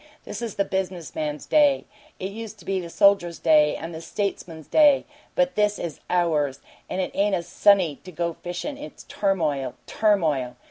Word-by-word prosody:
This - - -7
is 230 -4 -4
the 200 - +1
business 180 -8 -3
man's 150 -1 -3
day; 290 -3 +4 0.3
it 190 +1 -4
used 220 0 -8
to 175 - -16
be 195 -1 0
the 170 -2 -6
soldier's 175 -2 +3
day 150 -2 +4
and 165 +1 -6
the 160 - -7
statesman's 170 -5 -4
day, 295 -3 +5 0.3
but 270 0 +2
this 210 0 +1
is 165 -4 -5
OURS! 155 -6 +1 0.3
And - - -3
it 185 - -1
ain't 200 0 +2
a 170 - -2
Sunday 180 -3 +3
to 185 - -10
go 170 0 -2
fishin' 180 - -6
it's 300 - -10
turmoil! 155 -10 -1
turmoil! 155 - +1
180 Hz, 180 wpm, -24 LUFS, 160-205 Hz, 0.3 s, day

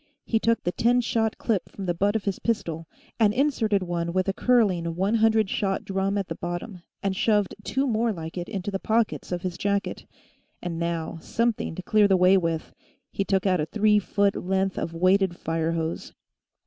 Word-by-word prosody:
He 225 - +1
took 230 +1 +1
the 175 - 0
ten 240 +6 +2
shot 225 -2 0
clip 215 -6 -1
from 195 - -7
the 175 - 0
butt 200 +5 +1
of 220 - 0
his 200 -2 -2
pistol 165 -8 -2 0.3
and 215 -1 +4
inserted 225 -8 +1
one 170 -1 -2
with 185 0 +1
a 195 - +1
curling 205 -7 +2
hundred 215 +5 +2
shot 195 0 -1
drum 195 +1 -1
at 195 -2 -2
the 165 - -3
bottom, 175 +3 -5 0.2
and 195 -1 0
shoved 210 -2 +2
two 270 +5 0
more 230 -2 +1
like 165 -4 -6
it 175 -1 -5
into 200 -1 -4
the 195 - -2
pockets 225 -1 0
of 175 -1 -3
his 180 -1 -4
jacket. 200 0 -1 0.5
And 170 -2 -4
now, 170 -1 -3
something 230 -5 -1
to 185 - -6
clear 210 +2 +4
the 190 -1 +4
way 180 +1 +5
with. 165 -4 -1 0.4
He 195 - -1
took 195 -1 0
out 185 -4 +2
a 150 - -2
three 210 +2 +3
foot 200 0 +1
length 190 +1 -1
of 165 - -4
weighted 185 +1 +3
fire 165 0 -1
hose. 165 0 -3
195 Hz, 200 wpm, -25 LUFS, 175-215 Hz, 0.5 s, way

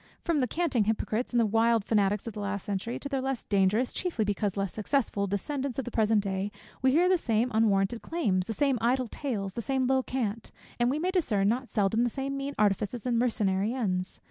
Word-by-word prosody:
From 335 -4 0
the 255 - +1
canting 280 -6 +1
hypocrites 220 +2 -1
and 230 -4 +2
wild 225 -1 +3
fanatics 205 -2 +1
of 230 - -5
the 210 - -7
last 200 -1 -3
century, 205 +4 -3
to - - -5
their 275 -2 -1
less 265 -2 -2
dangerous, 200 +5 +2
chiefly 335 - -1
because 205 -1 -1
less 195 -2 -1
successful, 215 -3 0
descendants 260 +6 -3
of 270 - -2
the 245 - -5
present 215 -2 +2
day, 195 +1 -2 0.3
we 260 - +4
hear 340 +6 +4
the 370 -1 +3
same 235 -2 +1
unwarranted 215 0 +2
claims, 195 - 0
the 225 - -2
same 270 +1 +1
idle 250 +2 +1
tales, 210 -7 -3
the 235 - -3
same 265 +2 0
low 265 +1 +3
cant; 230 -4 -3 0.3
and 240 0 +3
we 275 - 0
may 360 +4 0
discern 215 - +2
not 250 +3 -1
seldom 215 +2 +1
the 245 - +2
same 275 +3 -3
mean 275 +1 -4
artifices 210 +3 0
and 240 -2 +1
mercenary 215 -2 +1
ends. 185 -7 -2
230 Hz, 215 wpm, -28 LUFS, 205-265 Hz, 0.3 s, we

